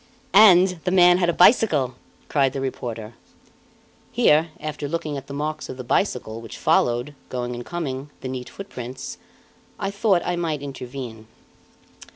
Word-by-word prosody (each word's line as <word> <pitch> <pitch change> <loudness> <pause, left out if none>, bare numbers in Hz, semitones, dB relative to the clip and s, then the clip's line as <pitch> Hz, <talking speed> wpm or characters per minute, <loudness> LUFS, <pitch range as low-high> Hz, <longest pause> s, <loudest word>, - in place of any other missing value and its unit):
"And 185 -3 +7
the 180 - 0
man 180 -1 +6
had 175 -2 +2
a 175 - -2
bicycle!" 170 - +5 0.3
cried 135 -3 +2
the 135 - -3
reporter. 120 -4 -5 1.0
Here, 155 +3 +4
after 150 -1 -4
looking 155 -1 -3
at 135 - -7
the 140 - -7
marks 155 +1 -4
of 130 - -6
the 130 - -6
bicycle, 120 - -1
which 115 - -9
followed, 120 +4 +1 0.2
going 125 -1 -3
and 120 0 -6
coming, 145 -4 -4
the - - -5
neat 130 -1 -5
footprints, 130 -11 -8 0.6
I 195 - -2
thought 200 -3 +2
I 180 - 0
might 160 -4 -2
intervene. 125 -5 -7
145 Hz, 155 wpm, -23 LUFS, 125-175 Hz, 1.0 s, And